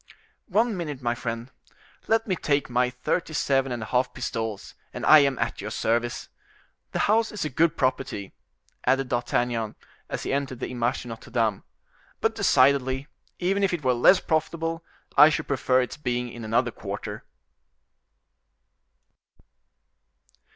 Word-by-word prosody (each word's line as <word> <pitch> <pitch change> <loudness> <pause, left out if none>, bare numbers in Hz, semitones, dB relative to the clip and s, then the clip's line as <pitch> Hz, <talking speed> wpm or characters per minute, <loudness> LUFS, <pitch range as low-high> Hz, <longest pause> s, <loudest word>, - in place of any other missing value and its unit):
"One 220 +3 +2
minute, 150 -7 -4
my 120 0 +1
friend; 120 +1 -5 0.6
let 225 0 +2
me 190 - 0
take 140 -5 0
my 125 +1 +2
thirty 125 +6 -2
seven 135 -3 +1
and 120 -2 -3
a - - -5
half 125 +2 0
pistols, 115 -4 -4 0.2
and - - -5
I 155 - +9
am 140 -2 +2
at - - -2
your - - -5
service. 120 +1 -1 0.6
The - - -2
house 225 +2 +2
is 210 -6 -3
a 155 - -3
good 160 +4 +2
property," 130 -7 -1 0.5
added 135 -1 +1
D'Artagnan, 120 -2 -1 0.3
as - - -4
he - - -2
entered 135 -3 -2
the - - -4
Image 120 -1 -1
de 120 - -9
Notre 115 0 -9
Dame, 110 -4 0 0.6
"but - - +1
decidedly, 130 0 +3 0.3
even 195 +3 0
if 195 -3 +2
it 160 - -8
were 130 -1 +3
less 125 +10 +6
profitable, 165 +1 -1 0.3
I 150 +2 +10
should 155 - -2
prefer 130 -2 +2
its 125 - -4
being 125 -4 -2
in 120 0 -9
another 120 +2 +1
quarter." - - -6
130 Hz, 150 wpm, -26 LUFS, 120-155 Hz, 0.6 s, I